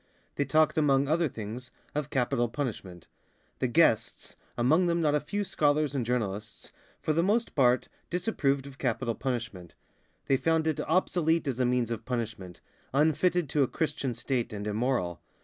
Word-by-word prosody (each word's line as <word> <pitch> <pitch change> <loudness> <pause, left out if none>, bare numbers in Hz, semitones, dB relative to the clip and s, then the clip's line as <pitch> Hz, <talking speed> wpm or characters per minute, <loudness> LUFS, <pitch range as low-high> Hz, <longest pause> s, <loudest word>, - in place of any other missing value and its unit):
They 145 - -1
talked 155 +1 +3
among 140 -2 +3
other 160 +2 +2
things 115 +3 -7 0.2
of 150 -1 -2
capital 125 -3 +1
punishment. 105 - -5 0.5
The 130 - +1
guests, 120 -3 +2 0.2
among 155 +10 +3
them 170 0 +1
not 150 -3 +2
a 150 - +3
few 205 +8 -3
scholars 150 -5 +1
and 135 -3 0
journalists, 110 -3 -3 0.3
for 155 - +1
the 165 - +2
most 215 +6 +1
part 125 -3 +3 0.2
disapproved 145 -7 0
of 140 0 -11
capital 120 -1 -1
punishment. 120 - -4 0.5
They 135 - +3
found 160 +2 +1
it 160 -2 0
obsolete 165 -2 +1
as 130 -2 -2
a 125 - +3
means 125 -2 +1
of 115 - -3
punishment, 115 -8 -5 0.3
unfitted 160 +4 +2
to 150 - +1
a 135 - +4
Christian 145 -5 -2
State 120 0 -2
and 105 -1 -5
immoral. 105 -5 -1
135 Hz, 165 wpm, -29 LUFS, 120-155 Hz, 0.5 s, a